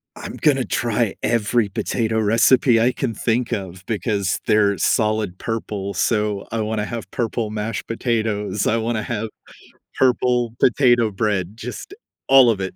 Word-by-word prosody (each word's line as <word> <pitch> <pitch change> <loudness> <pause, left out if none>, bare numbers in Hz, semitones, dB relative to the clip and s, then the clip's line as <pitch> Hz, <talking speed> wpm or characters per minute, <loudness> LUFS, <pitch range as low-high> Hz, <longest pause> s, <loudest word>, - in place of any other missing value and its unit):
I'm - - -8
gonna 135 -4 +2
try 115 -4 -1
every 115 -1 +1
potato 110 +3 -1
recipe 115 +3 +4
I 120 +3 +3
can 120 -2 -3
think 120 +1 -1
of, 95 -2 -5
because 100 -4 -1
they're 105 -2 +3
solid 110 -4 0
purple. 105 -3 -4
So, 105 0 0
I 115 -1 -1
wanna 105 -1 -2
have 115 0 -6
purple 115 -2 -2
mashed 110 +1 -4
potatoes, 110 -4 -1
I 115 - +2
wanna 115 0 -1
have 110 -1 -3 0.7
purple 125 -2 +2
potato 120 -3 +4
bread, 100 -1 -2
just, 125 - -7 0.3
all 135 -3 +7
of 100 - -3
it. 95 -1 -4
110 Hz, 145 wpm, -21 LUFS, 105-120 Hz, 0.7 s, all